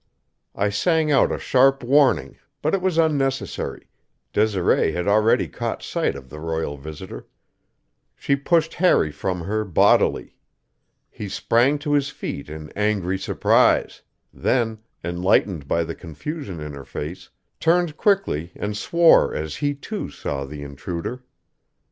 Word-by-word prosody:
I 100 Hz, +1 st, +1 dB
sang 160 Hz, -, +1 dB
out 135 Hz, -, +4 dB
a -, -, -1 dB
sharp 135 Hz, +1 st, +3 dB
warning, 130 Hz, -, +3 dB, 0.2 s
but 155 Hz, -, +1 dB
it 195 Hz, -, +1 dB
was 185 Hz, -3 st, 0 dB
unnecessary; 145 Hz, -5 st, -1 dB, 0.5 s
Desiree 100 Hz, -6 st, +2 dB
had 90 Hz, +2 st, -2 dB
already 105 Hz, +2 st, +3 dB
caught -, -, -4 dB
sight -, -, -1 dB
of 70 Hz, -1 st, -10 dB
the 75 Hz, +4 st, -10 dB
royal 80 Hz, -2 st, -3 dB
visitor. 75 Hz, +2 st, -9 dB, 0.9 s
She 140 Hz, -, 0 dB
pushed 160 Hz, +3 st, +1 dB
Harry 165 Hz, -, +3 dB
from 90 Hz, +4 st, -3 dB
her 110 Hz, +5 st, -1 dB
bodily. 95 Hz, -6 st, +2 dB, 0.8 s
He 105 Hz, -, -7 dB
sprang 120 Hz, +8 st, +2 dB
to 145 Hz, 0 st, -2 dB
his 140 Hz, -1 st, +2 dB
feet 70 Hz, -, -6 dB
in 75 Hz, 0 st, -8 dB
angry 100 Hz, -3 st, 0 dB
surprise; -, -, +2 dB, 0.3 s
then, 115 Hz, -3 st, 0 dB, 0.2 s
enlightened 85 Hz, -2 st, +1 dB
by 85 Hz, +3 st, +1 dB
the 85 Hz, -, -5 dB
confusion 95 Hz, -, -7 dB
in 75 Hz, -1 st, -6 dB
her 70 Hz, -1 st, -8 dB
face, 75 Hz, +7 st, -7 dB, 0.3 s
turned 170 Hz, -1 st, +2 dB
quickly 160 Hz, -, 0 dB
and 105 Hz, 0 st, -4 dB
swore 170 Hz, +10 st, +4 dB
as 80 Hz, 0 st, -4 dB
he, 145 Hz, -1 st, -1 dB
too, 205 Hz, +9 st, -5 dB
saw 70 Hz, -1 st, -4 dB
the 70 Hz, +1 st, -8 dB
intruder. 85 Hz, -, -6 dB
105 Hz, 140 wpm, -23 LUFS, -, 0.9 s, out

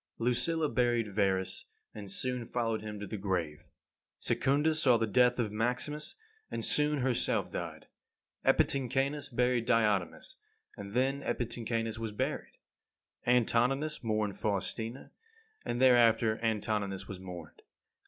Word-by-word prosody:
25. 115 Hz, -, -3 dB
Lucilla 160 Hz, +6 st, +1 dB
buried 120 Hz, -5 st, +1 dB
Verus, 95 Hz, -2 st, 0 dB, 0.3 s
and 105 Hz, -2 st, -8 dB
soon 125 Hz, +5 st, +1 dB
followed 115 Hz, -2 st, -1 dB
him 105 Hz, -1 st, -6 dB
to 105 Hz, -, -5 dB
the 110 Hz, -, -5 dB
grave. 85 Hz, -6 st, -2 dB, 0.5 s
Secunda 145 Hz, +4 st, +1 dB
saw 135 Hz, -6 st, +4 dB
the 115 Hz, -, +1 dB
death 125 Hz, +3 st, +3 dB
of 115 Hz, -4 st, -1 dB
Maximus, 125 Hz, +7 st, -2 dB, 0.3 s
and -, -, -3 dB
soon 150 Hz, -1 st, +2 dB
herself 125 Hz, -1 st, 0 dB
died. -, -, -5 dB, 0.6 s
Epitynchanus 135 Hz, +2 st, +1 dB
buried 125 Hz, -1 st, +1 dB
Diotimus, 105 Hz, -8 st, +1 dB, 0.4 s
and 100 Hz, 0 st, -8 dB
then 135 Hz, +3 st, +1 dB
Epitynchanus 115 Hz, -3 st, -2 dB
was 115 Hz, -1 st, -3 dB
buried. -, -, -3 dB, 0.7 s
Antoninus 125 Hz, +5 st, +2 dB
mourned 110 Hz, -3 st, -1 dB
Faustina, 110 Hz, +5 st, -3 dB, 0.5 s
and 120 Hz, -, -2 dB
thereafter 115 Hz, -3 st, +5 dB
Antoninus 105 Hz, -3 st, -1 dB
was 100 Hz, -2 st, -7 dB
mourned. 90 Hz, -4 st, -9 dB
115 Hz, 125 wpm, -31 LUFS, 105-125 Hz, 0.7 s, thereafter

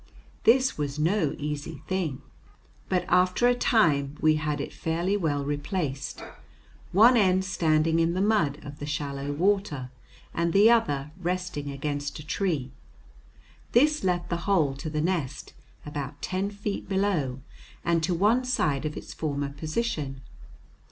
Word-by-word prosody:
This 255 Hz, -2 st, +4 dB
was 145 Hz, -1 st, -2 dB
no 160 Hz, 0 st, +1 dB
easy 150 Hz, 0 st, -5 dB
thing. 175 Hz, -8 st, -2 dB, 0.7 s
But 180 Hz, -1 st, +1 dB
after 185 Hz, +7 st, +3 dB
a 245 Hz, -, +5 dB
time 150 Hz, -, +2 dB
we 155 Hz, 0 st, +4 dB
had 150 Hz, -1 st, -2 dB
it 140 Hz, -, -5 dB
fairly 170 Hz, +5 st, -1 dB
well 145 Hz, -7 st, 0 dB
replaced, 145 Hz, -1 st, -3 dB, 0.7 s
one 225 Hz, +7 st, +7 dB
end 190 Hz, -4 st, +3 dB
standing 165 Hz, -3 st, +2 dB
in 165 Hz, +1 st, +2 dB
the -, -, 0 dB
mud 195 Hz, -9 st, +2 dB
of 145 Hz, 0 st, -9 dB
the 145 Hz, -, -5 dB
shallow 140 Hz, -1 st, -3 dB
water 155 Hz, -6 st, 0 dB, 0.4 s
and 170 Hz, 0 st, 0 dB
the 210 Hz, +4 st, +7 dB
other 145 Hz, -11 st, +1 dB
resting 175 Hz, -5 st, -2 dB
against 145 Hz, +1 st, -3 dB
a 150 Hz, -, -9 dB
tree. 155 Hz, -6 st, -1 dB, 1.0 s
This 300 Hz, +5 st, +4 dB
left 175 Hz, -1 st, 0 dB
the 170 Hz, -, +1 dB
hole 160 Hz, -9 st, +3 dB
to 155 Hz, -, -5 dB
the 150 Hz, 0 st, -1 dB
nest 160 Hz, -6 st, -2 dB, 0.3 s
about 145 Hz, -1 st, -5 dB
ten 190 Hz, +5 st, -2 dB
feet 205 Hz, -1 st, -5 dB
below 180 Hz, -10 st, 0 dB, 0.4 s
and 170 Hz, -1 st, +2 dB
to 175 Hz, +2 st, 0 dB
one 215 Hz, +8 st, +3 dB
side 155 Hz, -, 0 dB
of 150 Hz, -, -3 dB
its -, -, -8 dB
former 145 Hz, -2 st, -2 dB
position. 150 Hz, -, -3 dB
160 Hz, 145 wpm, -27 LUFS, 145-190 Hz, 1.0 s, one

